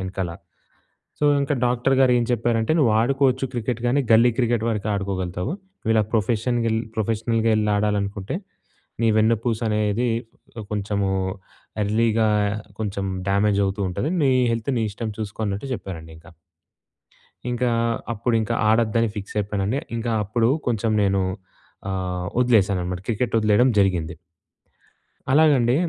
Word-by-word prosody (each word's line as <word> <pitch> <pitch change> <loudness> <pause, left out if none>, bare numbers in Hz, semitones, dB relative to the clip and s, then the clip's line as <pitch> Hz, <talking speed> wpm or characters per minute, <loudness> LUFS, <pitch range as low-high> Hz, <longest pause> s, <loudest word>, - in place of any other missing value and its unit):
యెనకాల. 95 -2 -3 0.9
So, 150 - -1 0.2
ఇంక 140 - -1
doctor 125 +2 +1
గారు 130 -2 +5
ఏం 120 - +1
చెప్పారంటే 115 +2 +1
నువ్వు 120 -7 +4
"ఆడుకోవచ్చు 135 +1 +2
క్రికెట్ 120 0 -2
గానీ 135 +4 +2
గల్లీ 115 +2 +6
క్రికెట్ 120 -2 +1
వరకు 105 -1 -2
ఆడుకోగలుగుతావు. 95 - -3 0.3
నువు 110 - 0
ఇలా 110 - +4
ప్రొఫెషన్‌గెల్ 115 +1 +1 0.2
ప్రొఫెషనల్‌గా 115 +1 0
యెళ్లి 105 -1 +1
ఆడాలనుకుంటే 100 - -1 0.7
నీ 115 - +4
వెన్నుపూస 115 +1 +1
అనేది 105 +3 0 0.6
కొంచెము 100 -1 -1 0.7
ఎర్లీగా 110 +1 +2 0.5
కొంచెం 100 -2 -2 0.2
డ్యామేజ్ 100 0 +2
అవుతూ 100 +2 -3
ఉంటది. 100 - -2
నీ 135 - +4 0.2
హెల్త్ 115 +3 -2
నీ 110 - 0
ఇష్టం 110 +1 -4
చూసుకో" 110 0 -6
అన్నట్టు 100 +7 -4
జెప్పారండి 80 -6 -8
ఇంక... 80 - -16 1.2
ఇంకా 125 0 0 0.4
అప్పుడు 115 +2 -1
ఇంకా 110 - -1
ఆడొద్దని 115 0 +2
ఫిక్స్ 100 +1 -7
అయిపోయానండి. 105 +4 -1 0.2
ఇంకా 115 +1 -2
అప్పుడు 115 +3 +1 0.2
కొంచెం 115 -2 0
నేను 100 -1 +2 0.7
ఆహ్, 90 -2 -3
వదిలేశాననమాట 95 -7 +2
క్రికెట్ 115 +1 -1
వదిలేయడం 110 +4 +4
జరిగింది. 90 -5 +1 1.2
అలాగండి. 140 -5 +4
110 Hz, 125 wpm, -23 LUFS, 100-120 Hz, 1.2 s, గల్లీ